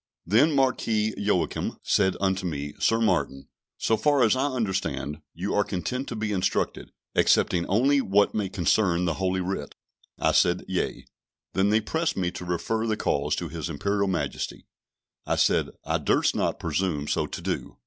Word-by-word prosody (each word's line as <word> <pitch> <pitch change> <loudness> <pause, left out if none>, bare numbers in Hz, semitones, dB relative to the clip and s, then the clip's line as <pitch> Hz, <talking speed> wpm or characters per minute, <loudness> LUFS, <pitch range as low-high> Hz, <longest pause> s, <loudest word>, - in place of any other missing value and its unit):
Then 120 - +4
Marquis 110 -5 +1
Joachim 100 -3 -1
said 95 -2 +2
unto 95 0 0
me 75 -2 -4
"Sir 115 - +2
Martin, 90 -11 0 0.3
so 110 - +2
far 140 +4 +3
as 115 - +4
I 135 +2 +1
understand, 95 - -2
you 95 +4 -3
are 105 - +3
content 125 +9 -3
to 120 - -5
be 105 -1 -2
instructed, 95 -3 -1 0.2
excepting 85 -2 +3
only 135 +8 +3
what 100 -2 +2
may 105 -3 -1
concern 90 -1 +2
the 85 - +1
Holy 95 0 +1
Writ." 90 -6 -4 0.4
I - - +2
said, 90 0 +2
"Yea;" 95 - -2 0.5
then 95 +3 +2
they 110 +1 +3
pressed 160 +9 -1
me 90 -2 0
to 90 - -7
refer 110 +6 -1
the 110 -1 0
cause - - 0
to - - -4
His 85 0 -5
Imperial 100 +6 0
Majesty; 85 -7 -3 0.6
I - - +1
said, - - +2 0.2
I - - 0
durst - - +2
not - - 0
presume 80 -6 -1
so - - 0
to - - -6
do. - - -4
95 Hz, 170 wpm, -26 LUFS, 90-110 Hz, 0.6 s, Then